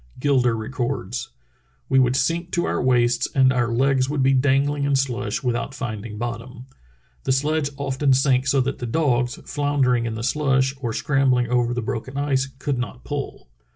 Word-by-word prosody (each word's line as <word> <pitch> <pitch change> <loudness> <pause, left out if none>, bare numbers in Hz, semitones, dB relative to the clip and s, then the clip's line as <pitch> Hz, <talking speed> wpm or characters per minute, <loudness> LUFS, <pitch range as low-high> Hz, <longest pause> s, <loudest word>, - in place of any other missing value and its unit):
Gilder 125 -4 +2
re 110 0 -5
cords: 120 -1 -3 0.6
"We 135 - +3
would 125 -1 +3
sink 165 +6 0
to 175 - +1
our - - -1
waists 120 -1 +2
and 130 -1 +5
our 120 -2 +1
legs 130 +2 +2
would 145 -2 0
be 135 +1 +4
dangling 140 +2 +2
in 140 0 +2
slush 125 -5 -1
without 125 +2 -2
finding 110 -4 -5
bottom. 120 +2 -6 0.6
The - - +1
sledge 145 +2 +1
often 140 0 0
sank 130 0 +2
so 135 0 +3
that 135 +2 -2
the 120 - -4
dogs, 125 -3 +1
floundering 135 -5 +1
in 110 - -4
the 110 - -5
slush 135 0 +1
or 120 -3 -2
scrambling 130 -2 +1
over 120 -1 +1
the 125 - -2
broken 125 +4 -4
ice, 140 -2 0
could 140 -1 -2
not 125 0 -5
pull. 145 - -5
130 Hz, 180 wpm, -23 LUFS, 120-140 Hz, 0.6 s, and